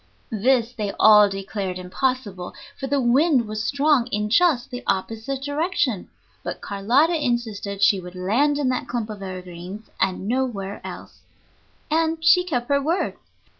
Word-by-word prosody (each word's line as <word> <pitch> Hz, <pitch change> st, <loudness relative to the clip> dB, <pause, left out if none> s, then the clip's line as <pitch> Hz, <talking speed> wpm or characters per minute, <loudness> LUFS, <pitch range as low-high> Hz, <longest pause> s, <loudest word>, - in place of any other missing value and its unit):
This 235 Hz, +2 st, +2 dB
they 210 Hz, -4 st, -3 dB
all 210 Hz, -1 st, +7 dB
declared 195 Hz, -1 st, -4 dB
impossible, 195 Hz, 0 st, -3 dB, 0.2 s
for 270 Hz, -, -5 dB
the 280 Hz, +1 st, +1 dB
wind 260 Hz, 0 st, +3 dB
was 215 Hz, 0 st, -3 dB
strong 280 Hz, -1 st, +2 dB
in 210 Hz, -2 st, -2 dB
just 275 Hz, -2 st, +3 dB
the 245 Hz, 0 st, -5 dB
opposite 225 Hz, +7 st, -2 dB
direction; 285 Hz, -, -1 dB, 0.3 s
but -, -, -5 dB
Carlotta 265 Hz, -, +1 dB
insisted 215 Hz, -5 st, -2 dB
she 195 Hz, -, +5 dB
would 180 Hz, 0 st, -10 dB
land 235 Hz, +11 st, +1 dB
in 285 Hz, -3 st, +1 dB
that 255 Hz, -, -2 dB
clump 230 Hz, -3 st, -3 dB
of 205 Hz, -2 st, -8 dB
evergreens 185 Hz, +2 st, -8 dB
and 190 Hz, 0 st, 0 dB
nowhere 225 Hz, -5 st, -2 dB
else. -, -, -9 dB, 0.7 s
And 325 Hz, +1 st, +2 dB
she 360 Hz, +2 st, +6 dB
kept 250 Hz, -9 st, -2 dB
her 280 Hz, 0 st, +3 dB
word. 330 Hz, +6 st, -1 dB
235 Hz, 150 wpm, -23 LUFS, 200-275 Hz, 0.7 s, all